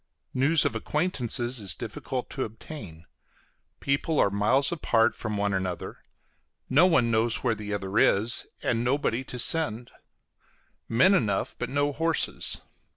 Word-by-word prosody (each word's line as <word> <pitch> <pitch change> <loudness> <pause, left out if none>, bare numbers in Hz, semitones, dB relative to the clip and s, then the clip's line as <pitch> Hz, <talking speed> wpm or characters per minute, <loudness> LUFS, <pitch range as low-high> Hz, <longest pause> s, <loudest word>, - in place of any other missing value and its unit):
News 145 +5 +3
of - - -1
acquaintances 125 -3 0
is 100 -3 +1
difficult 130 -2 -5
to 135 - -3
obtain; 105 - -10 0.7
people 145 +2 -1
are 100 - +3
miles 125 +8 +2
apart 120 -9 +2
from 110 -3 -5
one 100 0 0
another; 95 -2 -4 0.7
no 160 +8 +6
one 125 -9 +2
knows 115 +1 +1
where 120 -3 +2
the 105 -1 -7
other 100 +1 -1
is, 110 +5 +2 0.2
and 115 0 0
nobody 130 -1 0
to 125 - -7
send; 125 -4 +2 1.0
men 135 +13 +4
enough, 105 - 0
but - - -3
no 145 +1 0
horses. 165 +2 0
120 Hz, 140 wpm, -26 LUFS, 105-140 Hz, 1.0 s, no